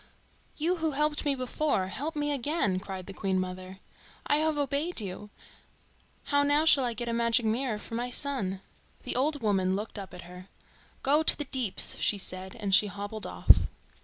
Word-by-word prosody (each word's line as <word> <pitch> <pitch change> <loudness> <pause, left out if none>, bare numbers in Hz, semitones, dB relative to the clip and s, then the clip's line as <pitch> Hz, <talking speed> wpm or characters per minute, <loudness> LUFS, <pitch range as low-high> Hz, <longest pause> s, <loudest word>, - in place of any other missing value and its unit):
"You 345 +4 +1
who 320 -2 -1
helped 300 0 +1
me 285 -1 +2
before, 255 -4 0
help 305 - -4
me 295 0 0
again!" 275 - 0
cried 190 -1 -7
the 195 - -8
Queen 190 -2 -1
mother. 185 0 -5 0.5
"I 290 - +3
have 310 0 +1
obeyed 285 +4 -1
you. 205 0 -6 0.9
How 285 -1 +2
now 290 +2 +3
shall 285 -4 +5
I 240 - -1
get 240 +2 -4
a 235 - -1
magic 235 0 +2
mirror 225 +1 0
for 210 - -10
my 240 +2 -2
son?" 245 -8 0 0.4
The - - -2
old 290 0 +1
woman 190 -3 +2
looked 210 +1 -5
up 195 - -8
at 180 - -9
her. 180 +2 -11 0.6
"Go 290 +3 +4
to 315 - +5
the 295 - -3
Deeps," 250 -8 -1
she 205 - +2
said, 185 0 -4
and 200 -3 -2
she 205 +2 +6
hobbled 205 +2 -5
off. - - +6
235 Hz, 190 wpm, -29 LUFS, 195-290 Hz, 0.9 s, she